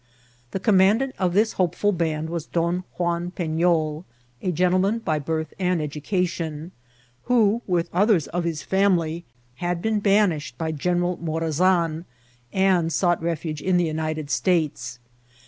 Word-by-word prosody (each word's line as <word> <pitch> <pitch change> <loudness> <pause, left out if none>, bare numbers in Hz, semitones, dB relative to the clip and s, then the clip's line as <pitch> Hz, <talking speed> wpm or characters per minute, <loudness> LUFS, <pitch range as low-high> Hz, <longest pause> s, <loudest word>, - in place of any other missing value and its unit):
The 195 - -3
commandant 210 +6 +3
of 180 -1 0
this 220 +2 +3
hopeful 195 +3 +1
band 160 -3 -2
was 170 -3 -4
Bon 170 +2 0
Juan 175 0 -1
PeSol, 160 -2 0 0.4
a 185 - 0
gentleman 185 +5 +2
by 160 -9 -1
birth 160 +2 -3
and 180 -2 +1
education, 160 +1 -3 0.5
who, 230 -2 +3
with 175 -2 +1
others 190 -3 +3
of 175 +1 -2
his 165 -3 -3
family, 175 -4 +1 0.3
had 175 +2 -2
been 220 +3 0
banished 195 - +1
by 160 +1 -2
General 175 +3 0
Morazan, 165 +1 0 0.5
and 185 -4 +2
sought 175 -1 +1
refuge 165 -2 -3
in 185 +1 +2
the 175 - +2
United 155 -2 -3
States. 160 -8 0
175 Hz, 135 wpm, -24 LUFS, 160-185 Hz, 0.5 s, commandant